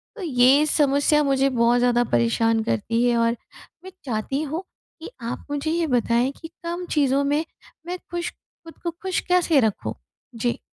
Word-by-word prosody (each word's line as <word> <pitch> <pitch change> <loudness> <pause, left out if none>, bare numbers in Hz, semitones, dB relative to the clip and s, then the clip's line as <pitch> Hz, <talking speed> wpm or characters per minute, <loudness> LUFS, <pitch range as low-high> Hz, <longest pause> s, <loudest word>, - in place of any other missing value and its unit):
तो 430 - -9
ये 270 0 +4
समस्या 295 0 +3
मुझे 275 -1 +2
बहुत 240 -1 +3
ज़्यादा 245 0 +3
परेशान 220 - +2
करती 230 - 0
है 240 -1 +2
और 230 0 +1 0.5
मैं 375 - -9
चाहती 250 +4 -2
हूँ 315 +5 -4 0.4
कि - - -7
आप 235 +1 -5
मुझे 290 +2 -1
ये 335 -1 0
बताएँ 245 0 +1
कि 325 - -7 0.2
कम 345 +1 -4
चीज़ों 280 -2 +2
में 295 +3 0 0.4
मैं 360 +1 -3
खुश 345 0 -3
खुद 330 -1 -18
को 340 - -1
खुश 375 -1 -1
कैसे 350 -5 +4
रखूँ? 220 -4 -1 0.4
जी। 235 +1 -1
275 Hz, 170 wpm, -23 LUFS, 235-320 Hz, 0.5 s, ये